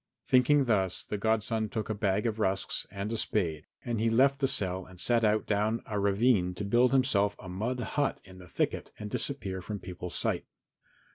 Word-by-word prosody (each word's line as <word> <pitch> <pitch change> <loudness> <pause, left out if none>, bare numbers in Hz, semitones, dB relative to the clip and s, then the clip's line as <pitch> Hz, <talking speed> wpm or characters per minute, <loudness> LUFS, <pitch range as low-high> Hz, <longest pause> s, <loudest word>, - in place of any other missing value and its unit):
Thinking 135 +2 +4
thus 95 -6 +1
the 105 - -4
godson 110 0 0
took 110 0 -3
a 110 - -1
bag 105 0 0
of 110 -1 -1
rusks 95 -2 0
and 100 +2 -4
a - - -1
spade, 80 -9 -1 0.2
and 120 -3 -1
he 115 +1 +2
left 135 +4 +4
the 135 - +2
cell 95 -5 -1
and 90 0 -15
set 120 +2 +2
out 110 0 +2
down 110 +2 0
a 105 -2 -2
ravine 100 -2 +2
to 100 - -4
build 120 +4 +4
himself 105 -7 +2
a 95 - -11
mud 110 +8 -3
hut 145 +2 -1
in 95 -1 -14
the 90 - -12
thicket - - -1
and 105 0 -7
disappear 100 -10 -3
from 105 +3 -5
people's 90 -3 -7
sight. - - 0
105 Hz, 200 wpm, -30 LUFS, 95-115 Hz, 0.2 s, Thinking